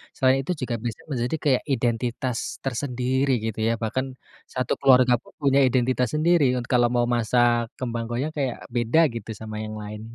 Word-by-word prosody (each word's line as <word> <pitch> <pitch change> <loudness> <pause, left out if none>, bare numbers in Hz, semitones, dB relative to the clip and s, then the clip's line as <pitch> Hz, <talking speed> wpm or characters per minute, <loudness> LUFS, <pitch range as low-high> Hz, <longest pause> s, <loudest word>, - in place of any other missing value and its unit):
selain 130 0 +3
itu 160 - -4
juga 120 -1 -2
bisa 115 -2 -4
menjadi 125 +3 -1
kayak 135 -4 +2
identitas 120 0 -1 0.3
tersendiri, 130 +1 -1
gitu 110 -1 -3
ya, 115 - +2
bahkan 130 +4 -1 0.5
satu 130 -2 -1
keluarga 130 -2 +5
pun - - -21
punya 140 0 +3
identitas 125 0 +1
sendiri 155 -5 +3
un 125 - -2
kalau 120 -1 +5
mau 120 - +3
masak 120 0 +2
kembang 120 -2 -3
goyang, 130 +7 -2
kayak 135 -4 -2
beda 120 +6 +2 0.2
gitu 115 -1 -7
sama 110 -1 -7
yang 110 0 -6
lain, 105 0 -7
125 Hz, 170 wpm, -24 LUFS, 120-130 Hz, 0.5 s, keluarga